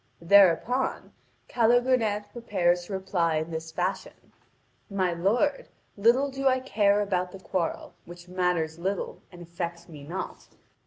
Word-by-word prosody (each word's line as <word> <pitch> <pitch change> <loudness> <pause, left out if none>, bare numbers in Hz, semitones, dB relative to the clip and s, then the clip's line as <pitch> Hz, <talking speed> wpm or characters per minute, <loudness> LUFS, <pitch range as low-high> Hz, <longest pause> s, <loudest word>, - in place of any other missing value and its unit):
Thereupon 200 +7 +3 0.3
Calogrenant 230 -3 +2
prepares 180 -7 0
to 200 - -7
reply 185 -4 0
in 160 +2 -2
this 160 0 -5
fashion: 185 +3 -4 0.6
"My 190 -3 0
lord, 230 - 0 0.3
little 240 +7 +3
do 270 0 -1
I 260 0 +3
care 210 -5 +2
about 185 -3 -1
the 195 - -10
quarrel, 185 -2 -3
which 175 +1 -12
matters 180 -3 -1
little 190 +2 -3
and 175 -1 -11
affects 170 0 -6
me 150 -4 -11
not. 170 +6 -6
190 Hz, 130 wpm, -27 LUFS, 175-215 Hz, 0.6 s, Thereupon